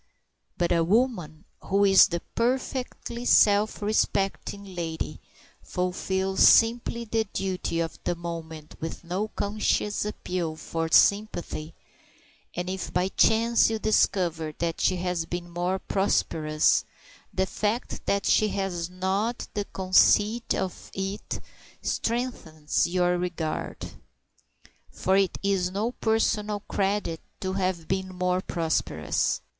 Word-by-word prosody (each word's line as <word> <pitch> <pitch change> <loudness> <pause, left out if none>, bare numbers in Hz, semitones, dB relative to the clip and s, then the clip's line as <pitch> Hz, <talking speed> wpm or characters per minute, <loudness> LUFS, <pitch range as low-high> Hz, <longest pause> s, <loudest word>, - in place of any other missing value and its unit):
But 175 -1 0
a 170 -1 +3
woman 180 -6 0 0.2
who 200 +1 +3
is 195 -1 +7
the 170 -1 -3
perfectly 250 0 -2
self 210 -2 +4
respecting 200 -1 -1
lady 160 -3 -4 0.4
fulfils 190 +1 -2
simply 235 0 +5
the 225 0 0
duty 185 -4 -2
of 165 -1 -3
the 175 - -1
moment 165 -2 -7
with 160 +2 -6
no 185 +5 -2
conscious 210 0 -1
appeal 180 -6 -3
for 165 +1 -3
sympathy; 175 -7 +2 0.8
and 175 0 -3
if 185 -1 -4
by 180 +1 +1
chance 230 +3 +4
you 225 - -1
discover 170 -7 +1
that 170 -1 -2
she 185 - +3
has 180 -2 -2
been 175 0 -4
more 175 +2 -1
prosperous, 155 -6 +1 0.5
the 190 - 0
fact 210 +5 -2
that 200 0 +1
she 215 - +4
has 190 -4 -2
not 190 +6 -2
the 205 -2 -2
conceit 205 +5 +3
of 185 - -4
it 195 +1 -4 0.4
strengthens 200 -12 -1
your 180 0 +1
regard. 170 -3 -3 1.0
For 190 - 0
it 195 -1 +2
is 195 -2 +1
no 205 +5 -1
personal 215 -3 0
credit 195 -5 -1 0.2
to 190 0 -2
have 185 -4 -1
been 190 0 -1
more 180 0 0
prosperous. 165 -4 -1
190 Hz, 120 wpm, -26 LUFS, 170-210 Hz, 1.0 s, is